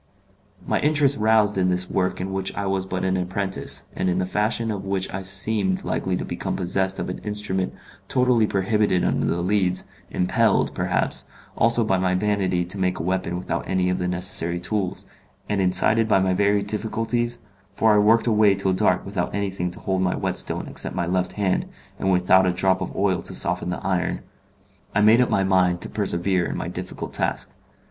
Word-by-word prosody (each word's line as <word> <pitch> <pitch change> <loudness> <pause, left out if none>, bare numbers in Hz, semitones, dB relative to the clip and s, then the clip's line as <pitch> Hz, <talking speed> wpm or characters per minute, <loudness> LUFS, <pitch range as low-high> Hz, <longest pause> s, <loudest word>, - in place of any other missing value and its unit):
My - - 0
interest 145 -3 +2
roused 105 -2 +3
in 90 0 +2
this 90 0 0
work 95 -1 -1
in 95 +1 -4
which 95 0 -3
I 100 - -3
was 95 -1 -1
but 90 0 -2
an 95 0 +1
apprentice, 95 +2 -2
and 95 - 0
in 90 - 0
the 95 - 0
fashion 110 +4 -1
in 100 -2 -4
which 95 -1 -2
I 95 - -3
seemed 110 - 0
likely 95 -1 -1
to - - -4
become - - -4
possessed 95 +1 0
of - - -3
an - - -5
instrument 105 -3 -2 0.3
totally 125 -3 +3
prohibited 100 -1 +1
under - - 0
the 85 - -1
Leads, 95 -1 +1 0.2
impelled, 90 - +1
perhaps, - - -1 0.3
also 115 +1 +3
by 95 -3 +1
my 90 0 +1
vanity 95 -3 0
to 95 +3 -2
make 90 -1 0
a - - -4
weapon 90 0 -1
without 90 - -3
any 90 -1 +1
of 90 - -2
the 90 - -1
necessary 90 -1 0
tools, 95 +1 -2 0.4
and 105 -2 0
incited 110 +4 +3
by 105 - +4
my 95 -1 +2
very 100 +1 +2
difficulties 115 +3 -2 0.3
(for 110 +2 +3
I 105 - +5
worked 110 +3 +4
away 105 -3 +4
till 95 -1 0
dark 90 0 +1
without 95 -2 -3
anything 95 -3 -2
to 90 - -8
hold 95 -1 -1
my 90 -1 +1
whetstone - - -2
except - - -5
my 90 - -1
left 90 +1 -1
hand, 100 -3 0 0.3
and 95 - +1
without 95 +1 +4
a - - +3
drop 95 +1 +1
of - - -5
oil 95 -3 +1
to - - -5
soften - - +1
the 90 - -5
iron), 95 -2 -1 0.7
I 105 - +3
made 110 +3 +6
up 125 - +2
my 95 - +2
mind 90 -2 +2
to - - -3
persevere 90 0 0
in - - -4
my - - -4
difficult - - -6
task. - - -2
95 Hz, 200 wpm, -23 LUFS, 90-105 Hz, 0.7 s, made